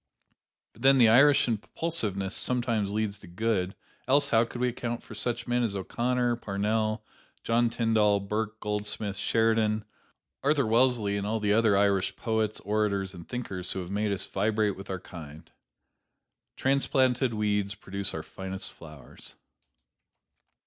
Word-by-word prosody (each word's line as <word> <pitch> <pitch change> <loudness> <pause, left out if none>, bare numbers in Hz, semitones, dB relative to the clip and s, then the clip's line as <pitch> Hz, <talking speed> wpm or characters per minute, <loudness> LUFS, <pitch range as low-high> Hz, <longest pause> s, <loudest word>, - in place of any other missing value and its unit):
But 115 - -18
then 135 +1 +6
the 120 -3 +6
Irish 140 +5 +6
impulsiveness 105 - -2
sometimes 120 -5 0
leads 105 -1 -2
to - - -14
good, 95 0 -1 0.3
else 140 +2 +4
how 115 0 +4
could 120 - -8
we 125 0 +2
account 120 -1 -4
for - - -11
such 120 -1 -2
men 120 0 +1
as 110 -4 -1
O'Connor, 120 +5 0
Parnell, 110 +1 -1 0.4
John 115 +1 +2
Tyndall, 110 -3 +2
Burke, 105 +2 -3
Goldsmith, 105 -1 -3
Sheridan, 110 0 +1 0.6
Arthur 145 0 +2
Wellesley 115 -3 +2
and 100 0 -3
all 110 +1 0
the 105 -1 +2
other 110 -2 +4
Irish 100 -1 +2
poets, 110 -1 -1
orators 100 -2 0
and 85 -2 -11
thinkers 95 -7 -3
who 95 - -3
have 90 +1 -7
made 105 +1 0
us 95 -1 -1
vibrate 105 0 0
with 95 +1 -10
our 95 -1 -3
kind? 80 -2 -11 1.1
Transplanted 130 -2 +2
weeds 105 -1 0
produce 100 0 -3
our - - -4
finest 95 0 -6
flowers. 75 -6 -12
110 Hz, 145 wpm, -28 LUFS, 100-120 Hz, 1.1 s, then